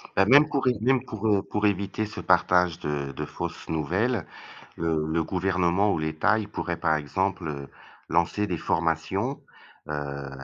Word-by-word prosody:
Bah, 95 - +5
même 145 +7 +7
pour 140 -3 0
évi 125 - +3
même 130 0 +3
pour, 110 -1 -6
heu, 100 -2 +3
pour 105 0 -2
éviter 100 +2 0
ce 110 +1 -8
partage 90 -1 +3
de 70 -3 -3
de - - -4
fausses - - -6
nouvelles, 90 - 0 0.5
heu, 80 -2 0
le 80 +1 0
gouvernement 90 +2 +1
ou 80 - 0
l'État, 80 +8 +1
il 105 - -4
pourrait, - - -3
par 80 - +2
exemple, 90 +5 -1
heu, 70 -2 -6 0.4
lancer 85 +5 +1
des 90 - -2
formations, 85 - -1 0.5
heu, 70 -2 -4
90 Hz, 165 wpm, -26 LUFS, 80-105 Hz, 0.5 s, même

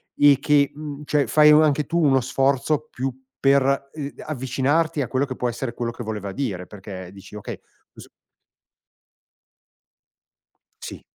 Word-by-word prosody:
e 145 -2 +6
che 145 -1 +3
mhmm, 150 -1 -7
cioè, 145 -1 +2
fai 150 0 +6
anche 150 -1 +4
tu 170 +4 -1
uno 135 -2 +4
sforzo 135 +4 0
più 130 +1 -3 0.3
per, 140 0 +2
uhm, 145 -2 -5
avvicinarti 145 +3 0
a 125 - -2
quello 135 +2 0
che 130 -2 -6
può 125 - -1
essere 120 0 -4
quello 120 -1 -3
che 120 - -8
voleva 105 -3 -5
dire 95 -7 -4
perché 95 -3 -9
dici: 100 +1 -13
"Okay 105 - -7 0.4
s" - - -12 2.8
Sì. - - -8
135 Hz, 145 wpm, -23 LUFS, 120-145 Hz, 2.8 s, e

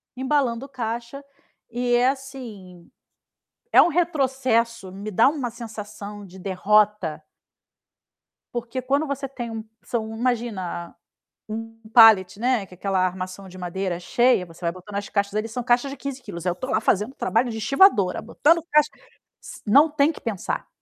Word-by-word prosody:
Embalando 260 -1 0
caixa, 240 +1 -5 0.5
e 245 +1 -1
é 245 +1 +4
assim, 235 -10 -8 0.8
é - - +9
um - - +4
retrocesso. 260 - 0
Me 200 +3 -6
dá 225 +6 +5
uma 275 -5 -2
sensação 210 -3 -8
de 190 0 -13
derrota. 195 -3 +1 1.3
Porque 240 +2 -3
quando 280 +4 +1
você 280 0 -3
tem 240 -3 -6
um 225 -1 -5 0.2
são, 225 -2 -3
imagina, 225 -8 -2 0.5
um 225 +1 -6
palete, 215 -5 +7
né, 245 -3 +1
que 185 - -16
é - - -14
aquela 195 0 0
armação 185 +1 -5
de 185 - -12
madeira 180 0 -3
cheia, 240 +1 +2
você 165 0 -16
vai 170 -1 0
botando 185 +3 -11
as 200 0 -3
caixas 200 -1 -1
ali. 215 +1 -1
São 240 +2 -4
caixas 245 +3 +2
de 280 - -7
15 275 0 -6
quilos. 170 -7 -8
Aí 180 - +2
eu - - -4
tô 255 - -6
lá - - +2
fazendo 210 +6 +1
trabalho 235 +3 +1
de 225 - -5
estivadora, 220 - +4
botando 310 +9 +2
caixa 300 0 +5 0.5
si - - -11
não 280 +9 +6
tem 295 0 +2
que - - -12
pensar. 215 -6 -3
225 Hz, 165 wpm, -24 LUFS, 195-260 Hz, 1.3 s, é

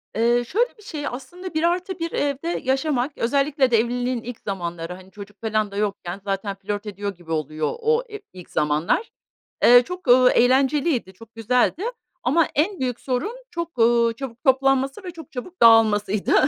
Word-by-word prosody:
Iıı, 240 +2 +2
şöyle 470 - 0
bir 425 - -17
şey, 300 -7 -5
aslında 345 +10 -7
1+1 345 +1 -1
evde 290 +4 -1
yaşamak, 270 0 0
özellikle 275 +2 +1
de 230 - +5
evliliğin 245 +1 -1
ilk 245 -1 -7
zamanları, 175 -3 -5
hani, 185 +1 -14
çocuk 205 +1 -12
falan 215 -2 0
da 200 - -7
yokken 200 -2 -3
zaten 195 0 -3
flört 205 +2 -5
ediyor 200 -1 -5
gibi 170 -2 -12
oluyor 155 0 -1
o 460 +2 +2
e 420 - -5
ilk 180 -2 -12
zamanlar. 150 - 0 0.5
Eee, - - +7
ııı, 245 - +9
çok 360 +1 -8 0.3
eğlenceliydi, 265 - +2
çok 225 +4 -16
güzeldi. 250 - +1 0.4
Ama 305 +5 +3
en 355 +6 0
büyük 250 -2 -2
sorun 260 - -2 0.2
çok, 340 - -5
ııı, 235 0 +4
çabuk 240 -1 -8
toplanması 270 +4 +2
ve 360 - -5
çok 325 -3 -12
çabuk 335 +8 -7
dağılmasıydı. 215 -3 +4
245 Hz, 165 wpm, -23 LUFS, 205-300 Hz, 0.5 s, ııı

